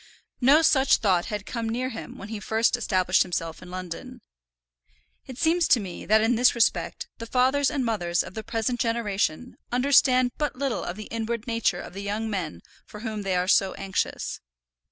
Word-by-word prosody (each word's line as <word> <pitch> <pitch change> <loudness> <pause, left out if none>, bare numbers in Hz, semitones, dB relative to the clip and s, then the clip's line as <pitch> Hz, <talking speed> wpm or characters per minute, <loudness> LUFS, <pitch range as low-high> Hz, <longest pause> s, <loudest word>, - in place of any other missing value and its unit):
No 285 +6 +6
such 275 -3 +4
thought 185 -5 +2
had 210 -2 -4
come 230 -2 -3
near 250 +3 -2
him 230 - -8
when 200 - -9
he 220 -1 -5
first 220 +3 +1
established 185 -5 +2
himself 165 -3 -2
in 180 - -11
London. 180 -2 -7 1.1
It 260 - -9
seems 330 +2 +2
to 245 - +5
me 185 -4 -7
that 215 +1 +5
in 225 +2 +3
this 245 +2 +4
respect 190 -7 0
the 230 - -6
fathers 260 +3 +2
and 280 -4 -1
mothers 175 -7 0
of - - -10
the 220 - -5
present 230 +2 -2
generation 230 -3 -1
understand 255 -1 +4
but 295 -1 -1
little 260 -4 -2
of 175 - -4
the 215 +1 -8
inward 230 0 -3
nature 230 -6 0
of - - -10
the 195 - -6
young 215 +2 -3
men 180 -6 -4 0.3
for 210 - -10
whom 220 -2 -4
they 195 -2 -1
are 180 0 0
so 190 0 +3
anxious. 195 -1 -3
225 Hz, 190 wpm, -26 LUFS, 195-250 Hz, 1.1 s, No